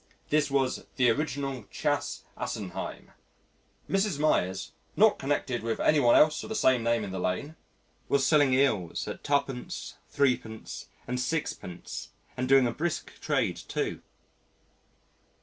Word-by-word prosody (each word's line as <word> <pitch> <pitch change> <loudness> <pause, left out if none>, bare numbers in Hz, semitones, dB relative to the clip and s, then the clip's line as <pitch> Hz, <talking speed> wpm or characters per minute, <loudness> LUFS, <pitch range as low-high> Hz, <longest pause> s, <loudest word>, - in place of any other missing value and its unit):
This 150 -1 +3
was 135 -2 0
"the 125 -3 +4
original 135 -3 -2
Chas. - - -1
Assenheim." 95 -2 -5 0.8
Mrs. 195 -4 +1
Meyers, 95 -11 +1 0.2
"not 215 +1 +5
connected 135 -3 -1
with 115 0 -2
any 150 - +4
one 120 -4 +5
else 155 0 +5
of - - -8
the 220 - -3
same 130 - +4
name 115 -1 +1
in 100 - -5
the 95 - -4
Lane" 140 - -2 0.5
was 140 -1 +3
selling 145 -4 +5
eels 130 -10 +1
at - - -6
2d., 140 -3 -2 0.2
3d. 125 -5 -1 0.2
and 125 +1 -2
6d. 125 - -4 0.3
and 130 0 -2
doing 135 -1 +6
a 120 - +1
brisk 160 +6 -3
trade - - 0
too. - - -3
130 Hz, 135 wpm, -29 LUFS, 115-145 Hz, 0.8 s, doing